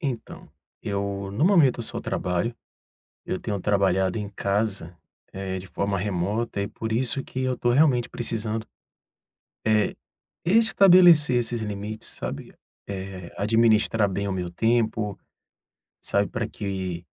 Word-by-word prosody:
Então, 130 Hz, -8 st, -5 dB, 0.3 s
eu 100 Hz, -1 st, -3 dB
no 125 Hz, +10 st, +1 dB
momento 160 Hz, -11 st, +4 dB
eu -, -, -3 dB
só -, -, -5 dB
trabalho, 90 Hz, +6 st, -2 dB, 0.7 s
eu 95 Hz, -, -3 dB
tenho 100 Hz, -4 st, -3 dB
trabalhado 95 Hz, -1 st, +1 dB
em 105 Hz, -1 st, -4 dB
casa, 100 Hz, -4 st, -2 dB, 0.4 s
eh, 95 Hz, -1 st, -4 dB
de 95 Hz, -, -9 dB
forma 100 Hz, +1 st, -2 dB
remota 100 Hz, +3 st, -2 dB
e 100 Hz, -, -3 dB
por 110 Hz, 0 st, -5 dB
isso 130 Hz, +3 st, 0 dB
que 130 Hz, -, -5 dB
eu 130 Hz, 0 st, 0 dB
estou 120 Hz, -1 st, 0 dB
realmente 130 Hz, -3 st, +3 dB
precisando, 110 Hz, -2 st, -2 dB, 1.0 s
eh, 110 Hz, -1 st, +2 dB, 0.5 s
estabelecer 180 Hz, -, +6 dB
esses 120 Hz, -1 st, -1 dB
limites, 105 Hz, +1 st, -5 dB
sabe, -, -, -5 dB, 0.3 s
eh, 95 Hz, -2 st, -7 dB
administrar 110 Hz, 0 st, +3 dB
bem 100 Hz, +1 st, -2 dB
o -, -, -2 dB
meu 90 Hz, -2 st, -3 dB
tempo, 110 Hz, 0 st, 0 dB, 0.8 s
sabe, 100 Hz, 0 st, +1 dB
para 115 Hz, -, -3 dB
que 95 Hz, -5 st, -5 dB
105 Hz, 135 wpm, -25 LUFS, 100-120 Hz, 1.0 s, estabelecer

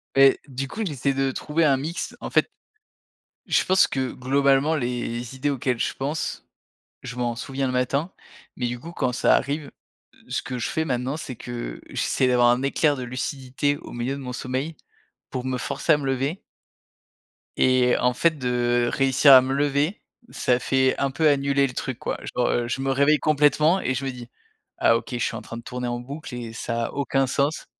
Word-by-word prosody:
Mais 135 Hz, 0 st, +6 dB
du 135 Hz, 0 st, -4 dB
coup, 220 Hz, +10 st, -6 dB
j'essaie 140 Hz, -4 st, -1 dB
de 135 Hz, 0 st, 0 dB
trouver 160 Hz, +4 st, -1 dB
un 140 Hz, -3 st, +4 dB
mix, 160 Hz, +6 st, -4 dB
en -, -, -6 dB
fait, -, -, +2 dB, 1.0 s
je -, -, +2 dB
pense 185 Hz, +1 st, +4 dB
que 130 Hz, -2 st, -2 dB
globalement 140 Hz, +3 st, +2 dB
les 120 Hz, -2 st, -3 dB
idées 145 Hz, +2 st, -1 dB
auxquelles 125 Hz, -3 st, -1 dB
je -, -, 0 dB
pense, 145 Hz, +4 st, -3 dB, 0.6 s
je 125 Hz, -, -7 dB
m'en 120 Hz, -1 st, -1 dB
souviens 135 Hz, +2 st, -3 dB
le -, -, -1 dB
matin 140 Hz, +7 st, 0 dB, 0.5 s
mais 125 Hz, -1 st, -1 dB
du 120 Hz, 0 st, -4 dB
coup 170 Hz, -, -9 dB
quand 130 Hz, -7 st, -1 dB
ça -, -, +4 dB
arrive, 145 Hz, 0 st, -2 dB, 0.6 s
ce -, -, -2 dB
que 125 Hz, -, -5 dB
je -, -, -1 dB
fais, 160 Hz, -, -1 dB
maintenant, 130 Hz, +1 st, -2 dB
c'est 130 Hz, -5 st, -6 dB
que 120 Hz, -, -6 dB
j'essaie 130 Hz, -, 0 dB
d'avoir 125 Hz, -1 st, +4 dB
un 120 Hz, +1 st, +2 dB
éclair 145 Hz, +2 st, +2 dB
de 130 Hz, -, -5 dB
lucidité 130 Hz, +3 st, -2 dB
au -, -, -11 dB
milieu 120 Hz, +3 st, -2 dB
de 140 Hz, -, -5 dB
mon 125 Hz, -2 st, -6 dB
sommeil 130 Hz, +5 st, -3 dB, 0.6 s
pour 130 Hz, 0 st, -4 dB
me 130 Hz, -1 st, -1 dB
forcer 160 Hz, +5 st, +1 dB
à -, -, +4 dB
me 145 Hz, -, -5 dB
lever 135 Hz, +6 st, -1 dB, 1.2 s
et 130 Hz, -1 st, +4 dB
en 125 Hz, 0 st, +2 dB
fait, 165 Hz, +6 st, +3 dB
de 120 Hz, -1 st, +1 dB
réussir 135 Hz, +1 st, +5 dB
à 130 Hz, -, +10 dB
me 130 Hz, +1 st, -2 dB
lever, 145 Hz, +6 st, 0 dB, 0.3 s
ça 125 Hz, 0 st, +1 dB
fait 130 Hz, 0 st, +2 dB
un 140 Hz, -1 st, 0 dB
peu 155 Hz, +3 st, +2 dB
annuler 140 Hz, -1 st, +3 dB
le 125 Hz, -, -8 dB
truc, 130 Hz, -1 st, -4 dB
quoi, -, -, -3 dB, 0.2 s
genre, 125 Hz, 0 st, +2 dB
heu, 120 Hz, -1 st, 0 dB
je 130 Hz, +2 st, -2 dB
me 135 Hz, -, 0 dB
réveille 140 Hz, +3 st, +4 dB
complètement 155 Hz, +4 st, +3 dB
et 130 Hz, -, 0 dB
je 135 Hz, +2 st, -3 dB
me 135 Hz, -, -1 dB
dis: 120 Hz, -2 st, -10 dB, 0.5 s
«Ah! 115 Hz, -, +4 dB
OK, -, -, -8 dB
je -, -, -1 dB
suis -, -, -1 dB
en -, -, -5 dB
train 115 Hz, -, -8 dB
de -, -, -7 dB
tourner 125 Hz, 0 st, -4 dB
en 120 Hz, 0 st, -2 dB
boucle 140 Hz, +3 st, -8 dB
et 115 Hz, -2 st, -6 dB
ça 115 Hz, 0 st, -2 dB
a -, -, -5 dB
aucun 135 Hz, -1 st, 0 dB
sens». 140 Hz, +4 st, 0 dB
135 Hz, 205 wpm, -24 LUFS, 125-140 Hz, 1.2 s, à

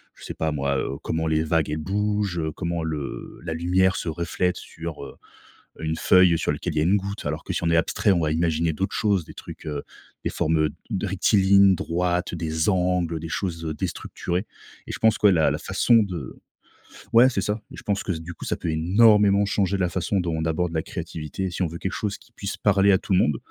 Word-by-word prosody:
je -, -, -16 dB
sais -, -, -6 dB
pas 80 Hz, -1 st, -1 dB
moi, 70 Hz, -1 st, -1 dB
heu, 70 Hz, -, -3 dB
comment 80 Hz, 0 st, -1 dB
les 80 Hz, 0 st, +1 dB
vagues 80 Hz, -1 st, +1 dB
elles 75 Hz, -, -2 dB
bougent, 100 Hz, +1 st, -1 dB
comment 85 Hz, -2 st, -2 dB
le 75 Hz, -3 st, -5 dB
la 80 Hz, -2 st, -3 dB
lumière 90 Hz, +3 st, +2 dB
se 85 Hz, -, -3 dB
reflète 90 Hz, +2 st, -1 dB
sur, 80 Hz, -3 st, -7 dB
heu -, -, -10 dB, 0.7 s
heu 80 Hz, -, -5 dB
une 80 Hz, +1 st, -1 dB
feuille 90 Hz, -1 st, +5 dB
sur -, -, 0 dB
lequel -, -, -4 dB
il -, -, -7 dB
y -, -, +3 dB
a 75 Hz, -, +2 dB
une 95 Hz, -, +3 dB
goutte, 100 Hz, -3 st, -4 dB
alors 75 Hz, +1 st, -3 dB
que -, -, -5 dB
si -, -, -2 dB
on 85 Hz, -, +2 dB
est -, -, +3 dB
abstrait, 90 Hz, +4 st, +2 dB
on 85 Hz, -, +2 dB
va 75 Hz, -, 0 dB
imaginer 80 Hz, 0 st, +1 dB
d'autres 95 Hz, +6 st, -3 dB
choses, 100 Hz, -5 st, +1 dB
des -, -, -13 dB
trucs, -, -, -10 dB
heu, 75 Hz, -2 st, -3 dB, 0.4 s
des -, -, -1 dB
formes, 80 Hz, +1 st, 0 dB
heu, 75 Hz, -1 st, +2 dB, 0.3 s
rectilignes 100 Hz, 0 st, +4 dB
droites, 90 Hz, +1 st, -1 dB
des 80 Hz, +1 st, -1 dB
angles, 90 Hz, -3 st, +1 dB
des 80 Hz, -, -7 dB
choses, 85 Hz, -2 st, -3 dB
heu, 80 Hz, -1 st, -3 dB
déstructurées. 90 Hz, +5 st, -3 dB, 0.4 s
Et -, -, -6 dB
je -, -, -5 dB
pense 110 Hz, -1 st, +4 dB
que 105 Hz, -, +4 dB
la 85 Hz, -5 st, +4 dB
la -, -, -1 dB
façon 120 Hz, -, +2 dB
de 90 Hz, -4 st, -6 dB, 0.8 s
ouais, 120 Hz, +3 st, +7 dB
c'est 100 Hz, -, -1 dB
ça 105 Hz, +2 st, -2 dB
et -, -, -9 dB
je -, -, -10 dB
pense 100 Hz, -1 st, 0 dB
s -, -, -5 dB
que -, -, -2 dB
du 80 Hz, +2 st, -7 dB
coup, -, -, -9 dB
ça -, -, -1 dB
peut 85 Hz, -, -3 dB
énormément 100 Hz, +4 st, +4 dB
changer 100 Hz, -1 st, 0 dB
la 95 Hz, -2 st, +1 dB
façon 95 Hz, +3 st, -1 dB
dont 85 Hz, -2 st, -1 dB
on 80 Hz, 0 st, -2 dB
aborde 80 Hz, +2 st, 0 dB
la 80 Hz, -, 0 dB
créativité. 85 Hz, +2 st, -5 dB
Si 90 Hz, -, -5 dB
on 90 Hz, -, +2 dB
veut 85 Hz, +1 st, -7 dB
quelque 95 Hz, -, -3 dB
chose 105 Hz, -1 st, -3 dB
qui -, -, -23 dB
puisse 100 Hz, -3 st, -5 dB
parler 100 Hz, -1 st, +4 dB
à 95 Hz, -, +5 dB
tout 95 Hz, -, -3 dB
le 90 Hz, -, +5 dB
monde, 75 Hz, -6 st, +2 dB
90 Hz, 240 wpm, -24 LUFS, 80-100 Hz, 0.8 s, ouais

